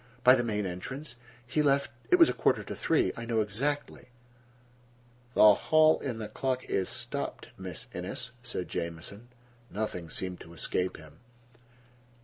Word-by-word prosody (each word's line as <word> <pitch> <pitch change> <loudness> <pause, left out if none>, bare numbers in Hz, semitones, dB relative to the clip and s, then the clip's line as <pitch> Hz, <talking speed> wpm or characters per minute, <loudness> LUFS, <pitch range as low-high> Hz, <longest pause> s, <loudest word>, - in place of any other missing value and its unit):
"By 125 - +9
the 125 -2 +3
main 105 -3 -1
entrance. 125 +10 -6 0.3
He 140 +5 +1
left—it 140 - +2
was 335 -2 +8
a - - 0
quarter - - +2
to - - -6
three. 160 - +2
I 115 - -6
know 115 -1 +1
exactly." 140 +8 -2 1.3
"The - - +4
clock 155 +8 +4
in 125 -4 -2
the 110 -1 -4
hall 130 -2 0
is 95 - 0
stopped, - - -4
Miss - - -6
Innes," 100 +7 -5
said 120 -7 -4
Jamieson. 85 +7 -5 0.4
Nothing 95 -6 -4
seemed 90 +1 -4
to 85 - -12
escape 90 +2 -1
him. 80 -1 -15
115 Hz, 145 wpm, -30 LUFS, 90-135 Hz, 1.3 s, By